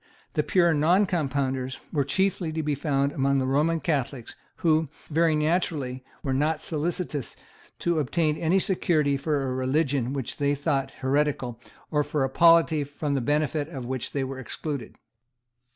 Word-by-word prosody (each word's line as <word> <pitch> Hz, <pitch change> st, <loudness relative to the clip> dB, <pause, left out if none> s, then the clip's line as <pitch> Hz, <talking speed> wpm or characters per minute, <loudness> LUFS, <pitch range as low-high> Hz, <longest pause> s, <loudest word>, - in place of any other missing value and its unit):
The 150 Hz, -, +2 dB
pure 170 Hz, +3 st, +3 dB
Noncompounders 145 Hz, -6 st, +1 dB
were 145 Hz, -3 st, +2 dB
chiefly 180 Hz, +3 st, 0 dB
to 160 Hz, 0 st, -2 dB
be 150 Hz, 0 st, 0 dB
found 140 Hz, -1 st, 0 dB
among 140 Hz, 0 st, +1 dB
the 130 Hz, -, +1 dB
Roman 150 Hz, +5 st, +2 dB
Catholics, 140 Hz, -6 st, -2 dB, 0.2 s
who, 160 Hz, -2 st, +2 dB, 0.2 s
very 160 Hz, 0 st, +3 dB
naturally, 150 Hz, -5 st, 0 dB, 0.2 s
were 135 Hz, -, -1 dB
not 150 Hz, +3 st, +1 dB
solicitous 155 Hz, -2 st, -3 dB, 0.4 s
to 170 Hz, -2 st, 0 dB
obtain 155 Hz, +2 st, +1 dB
any 165 Hz, +4 st, +2 dB
security 160 Hz, -6 st, +1 dB
for 140 Hz, 0 st, -1 dB
a 130 Hz, -1 st, -2 dB
religion 130 Hz, -1 st, 0 dB
which 135 Hz, -4 st, -4 dB
they 145 Hz, 0 st, +1 dB
thought 140 Hz, -1 st, 0 dB, 0.2 s
heretical, 135 Hz, -4 st, 0 dB, 0.3 s
or 150 Hz, -1 st, +2 dB
for 145 Hz, -1 st, -1 dB
a 135 Hz, -, 0 dB
polity 165 Hz, 0 st, +5 dB
from 145 Hz, +1 st, -3 dB
the 135 Hz, -, +1 dB
benefits 150 Hz, +3 st, 0 dB
of 130 Hz, -5 st, -6 dB
which 130 Hz, 0 st, -3 dB
they 140 Hz, -, -1 dB
were 130 Hz, 0 st, -5 dB
excluded. 135 Hz, 0 st, -5 dB
145 Hz, 155 wpm, -26 LUFS, 135-160 Hz, 0.4 s, polity